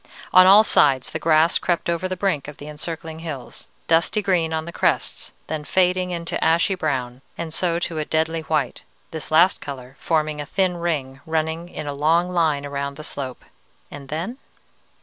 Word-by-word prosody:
On 185 0 +8
all 200 +3 +9
sides 135 - +3
the 160 - -3
grass 160 +1 +3
crept 175 -2 -1
over 170 +2 0
the 185 - -3
brink 180 -8 -1
of 150 - -9
the 145 - -10
encircling 160 +1 -6
hills, 150 -6 -8 0.2
dusty 165 +6 +2
green 175 -4 +1
on 160 0 -2
the 170 - -6
crests, - - -1
then 155 -1 -4
fading 180 +2 +1
into 170 -1 -3
ashy 170 +4 +3
brown, 130 -8 -2 0.2
and 165 -2 -5
so 170 -1 0
to 170 -2 -3
a 155 - -2
deadly 160 +1 0
white, 155 -5 -1 0.3
this 160 -2 -6
last 170 +4 +4
color 130 -2 -8
forming 155 -2 0
a - - -5
thin 185 -1 0
ring, 140 -6 -3
running 160 +2 -2
in 155 - -6
a 145 - -3
long 165 +5 +2
line 155 -5 +1
around 140 0 -4
the 155 - -8
slope. 130 -4 -6 0.5
And 140 -1 -10
then? 180 - -4
160 Hz, 185 wpm, -22 LUFS, 145-170 Hz, 0.5 s, all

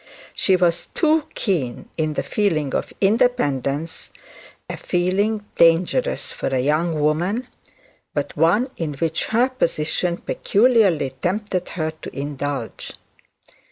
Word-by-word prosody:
She 190 - +2
was 175 -2 +1
too 315 -2 +3
keen 150 - -2
in 155 -1 -1
the - - -1
feeling 160 -10 0
of - - -2
independence, 160 - +1 0.6
a - - -4
feeling 200 +4 0
dangerous 180 - +3
for - - -3
a 135 - 0
young 155 +4 +1
woman, 175 +11 0 0.7
but 145 -1 -2
one 175 - +3
in 155 -4 -3
which 160 +2 -1
her 235 +3 +2
position 170 -6 -1
peculiarly 200 - +2
tempted 190 -1 -1
her 160 -2 -2
to - - -8
indulge. 145 0 -4
170 Hz, 120 wpm, -22 LUFS, 150-210 Hz, 0.7 s, too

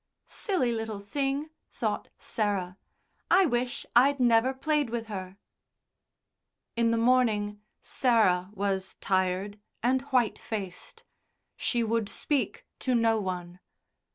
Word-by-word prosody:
"Silly 295 - 0
little 225 -2 -3
thing," 275 +8 -2 0.2
thought - - -3
Sarah. 200 -4 -2 0.5
"I 375 +2 +6
wish 245 -4 -1
I'd 275 +3 +5
never 240 0 +4
played 295 0 0
with 230 0 -3
her." 190 -3 -6 1.4
In 235 0 +2
the 230 - +2
morning 225 -4 +2 0.2
Sarah 195 -8 +2
was 195 -1 -2
tired 190 +2 0 0.2
and 255 +2 +3
white 250 -5 +2
faced. 195 -5 -6 0.5
She 240 -1 0
would 225 -2 0
speak 290 -3 -2
to 255 -2 +1
no 225 -1 +3
one. 180 -2 -5
225 Hz, 115 wpm, -28 LUFS, 200-255 Hz, 1.4 s, I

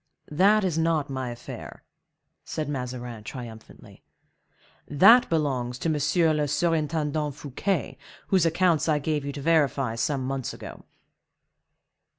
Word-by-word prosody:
"That 200 +7 +4
is 170 -4 0
not 160 -4 0
my 130 -2 -3
affair," 120 0 -9 0.6
said 155 -2 -4
Mazarin, 125 -5 -5
triumphantly; 115 -1 -10 0.9
"that 200 - +6
belongs 130 -6 -1
to 165 - -2
M. 155 +2 +2
le 150 -1 0
Surintendant 155 -2 -1
Fouquet, 165 +7 -3 0.3
whose 190 -3 +3
accounts 165 -2 +2
I 150 - +3
gave 150 0 -1
you 140 - -3
to 145 - -6
verify 140 -7 +2
some 130 +3 -1
months 135 -1 -3
ago." - - -10
150 Hz, 125 wpm, -26 LUFS, 130-165 Hz, 0.9 s, that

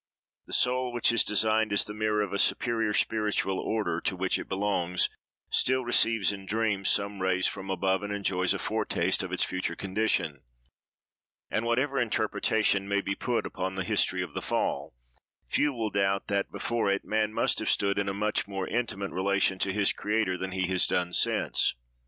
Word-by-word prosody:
"The - - -9
soul, 125 0 +1
which 120 -1 +2
is 115 - +3
designed 110 +1 +2
as 100 - +3
the 105 - -7
mirror 105 0 0
of 100 - -5
a 100 - -1
superior 115 -3 +2
spiritual 105 -3 0
order" 105 -6 -1
(to - - -1
which 95 0 0
it - - -8
belongs), 95 -3 0 0.4
still 130 0 +2
receives 115 -4 +3
in 95 -1 -8
dreams, 105 -3 0
some 100 -1 +1
rays 95 0 +1
from 95 -1 -2
above, 95 0 0
and 105 0 -5
enjoys 95 -3 0
a - - -1
foretaste - - 0
of - - -5
its - - +1
future 95 0 -2
condition; 95 -7 -1 1.1
and, 110 - 0
whatever 135 +4 +1
interpretation 110 -3 +1
may 100 0 +1
be 100 - -2
put 120 +4 -1
upon 95 +1 -4
the 95 - -2
history - - +1
of - - -8
the - - -3
Fall, - - -2 0.5
few 145 - +2
will 115 -5 -3
doubt 100 0 +1
that, 100 -1 -1
before 120 -3 -1
it, 100 0 0
man 110 0 0
must - - +1
have - - -1
stood 100 0 +2
in 100 -1 -1
a - - 0
much 105 +2 -1
more 95 -2 -4
intimate 105 -4 -2
relation 95 0 +1
to 95 - +1
his 100 0 +2
Creator 105 -3 0
than 95 +1 -4
he 95 -1 -1
has 95 -1 +2
done 90 0 -1
since. - - +2
100 Hz, 190 wpm, -28 LUFS, 95-110 Hz, 1.1 s, is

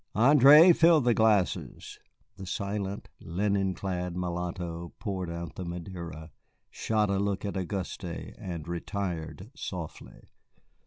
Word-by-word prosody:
"André, 145 +7 +8
fill 165 -1 +6
the 120 -3 +3
glasses." 110 -5 0 0.4
The 95 -1 -9
silent, 100 0 -3
linen 95 +2 -1
clad 90 -2 -3
mulatto 85 -1 -4
poured 95 -6 -4
out 85 -3 -6
the 95 - -6
Madeira, 85 -2 -7 0.4
shot 105 -2 0
a 95 - +1
look 100 0 -1
at 100 - -3
Auguste, 95 0 -4
and 85 -1 -7
retired 85 - -4
softly. 90 - -8
95 Hz, 115 wpm, -28 LUFS, 85-105 Hz, 0.4 s, André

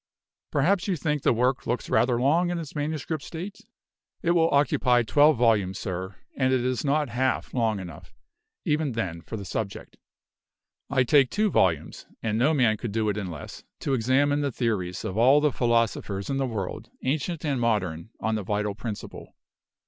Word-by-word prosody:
Perhaps 175 +8 +1
you 190 - +1
think 150 -2 -1
the - - +3
work 125 +3 +1
looks 120 +2 -2
rather 120 -1 +2
long 160 +7 +3
in 175 - -1
its 160 -4 -6
manuscript 155 +1 -3
state? 180 +6 -7 0.6
It 170 - +2
will 165 -1 +4
occupy 125 -4 +3
twelve 145 +5 +4
volumes, 105 -5 +2
sir, 95 0 -5 0.2
and 130 -1 +1
it 130 -1 +2
is 125 -2 -1
not 145 -1 +1
half 130 +3 -1
long 115 -5 +1
enough, 85 -5 -10 0.5
even 150 -3 0
then, 90 -8 -3
for 110 - -7
the 100 - -7
subject. 100 +3 -5 0.9
I 135 -2 +3
take 135 0 +4
two 210 -1 +1
volumes 80 -4 0 0.2
(and 110 0 0
no 135 +6 +4
man 120 -8 +3
could 115 0 -5
do 110 0 0
it 105 - -1
in 100 -3 -3
less) 80 -4 -9 0.2
to 140 - -1
examine 135 +4 +2
the 140 -1 -1
theories 100 -7 -2
of 95 +4 -2
all 130 +5 +6
the 150 -1 +2
philosophers 115 -4 0
in 135 - 0
the 135 -1 0
world, 105 -6 -5
ancient 155 +4 -2
and 140 -4 0
modern, 95 -7 -1
on 110 - -1
the 110 - -1
Vital 105 +1 -1
Principle. 110 0 -7
125 Hz, 180 wpm, -26 LUFS, 105-145 Hz, 0.9 s, all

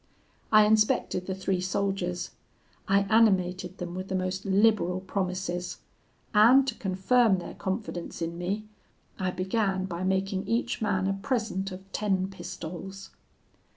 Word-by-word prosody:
I 215 -1 +7
inspected 215 -4 +2
the 190 - -2
three 190 -1 -1
soldiers; 185 -1 -2 0.6
I 195 +1 +4
animated 190 -4 +2
them 175 -1 -5
with 185 +1 -5
the 190 - -2
most 185 +1 -2
liberal 195 -2 +3
promises; 185 -2 -3 0.6
and 240 +6 +7
to 260 - 0
confirm 200 +2 +2
their 175 - -7
confidence 190 -3 -4
in 170 0 -3
me, 195 +5 -3 0.5
I 185 -1 0
began 190 0 0
by 180 -1 -4
making 190 0 0
each 230 +1 -1
man 190 -3 +1
a 195 - +1
present 205 -2 -2
of 185 +1 -8
ten 195 -3 0
pistoles. 180 +1 -8
190 Hz, 135 wpm, -28 LUFS, 185-210 Hz, 0.6 s, I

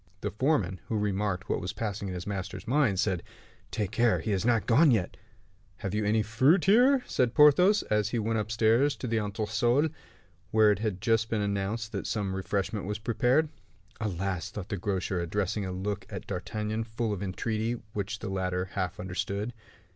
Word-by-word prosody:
The - - -2
foreman, 105 - +1
who 110 - -1
remarked 100 -2 -1
what - - -1
was 90 - -4
passing 100 -2 -3
in 90 - -4
his 90 - -5
master's 100 -1 -5
mind, 125 -7 +2
said, 95 -4 +1 0.5
"Take 105 -3 -2
care; 115 +1 +3
he 110 - -3
is 95 -2 0
not 115 -1 +2
gone 145 +7 +5
yet." 110 -8 +1 0.6
"Have 95 - -4
you 105 0 0
any 110 +1 +2
fruit 130 - +3
here?" 245 +6 +5
said 125 -2 0
Porthos, 180 +8 +6
as 105 -1 +1
he 120 - -1
went 110 0 0
upstairs 115 +6 +2
to - - -7
the 115 -2 +1
entresol, 115 +7 +1 0.6
where 110 -1 +5
it 100 - 0
had 105 -4 -2
just 115 -1 +2
been 110 -2 0
announced 100 +3 -2
that - - -4
some 100 -4 -2
refreshment 100 +1 -2
was 105 0 -2
prepared. 125 +7 +2 0.5
"Alas!" 95 -5 -2
thought 100 -3 -7
the 100 - -1
grocer, 95 -1 -2
addressing 95 +3 -1
a - - -4
look 100 +3 -3
at 95 -4 -6
D'Artagnan 105 +3 -3
full 110 -1 -2
of 100 - -5
entreaty, 110 +4 -2
which 105 0 -3
the 105 - -6
latter 95 -1 -2
half 95 0 -2
understood. 100 +4 -3
105 Hz, 185 wpm, -29 LUFS, 95-115 Hz, 0.6 s, Porthos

